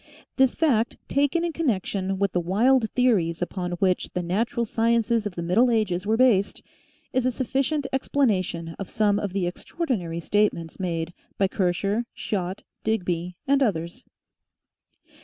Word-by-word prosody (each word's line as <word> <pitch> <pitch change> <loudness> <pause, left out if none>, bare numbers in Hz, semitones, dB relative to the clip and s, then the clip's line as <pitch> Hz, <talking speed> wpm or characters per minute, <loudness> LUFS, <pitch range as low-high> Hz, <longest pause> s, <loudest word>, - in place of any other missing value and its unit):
This 265 -2 +4
fact, 235 -8 +1
taken 285 +5 +1
in 335 - -2
con 330 -1 -2
nection 195 -3 -1
with 200 -1 +1
the 180 - +1
wild 220 +7 +3
theories 200 -10 +2
upon 180 0 -3
which 185 +1 +1
the 180 - -1
natural 230 +7 0
sciences 230 0 +1
of 190 - -8
the 170 - -3
middle 210 +9 +3
ages 205 -5 0
were 220 +1 +2
based, 225 -6 +3 0.5
is 255 -1 +2
a - - +2
sufficient 275 +4 -1
ex 265 - -1
planation 185 -11 0
of 195 - -5
some 205 -1 +2
of 205 - -3
the 190 -1 -1
extraordinary 180 - -3
statements 170 -3 0
made 170 -2 -2 0.2
by 195 - +3
Kircher, 195 +4 0
Schott, 185 -2 -3 0.2
Digby, 180 -5 -1
and 280 0 +3
ethers. 175 -1 -1
205 Hz, 155 wpm, -25 LUFS, 180-245 Hz, 0.5 s, This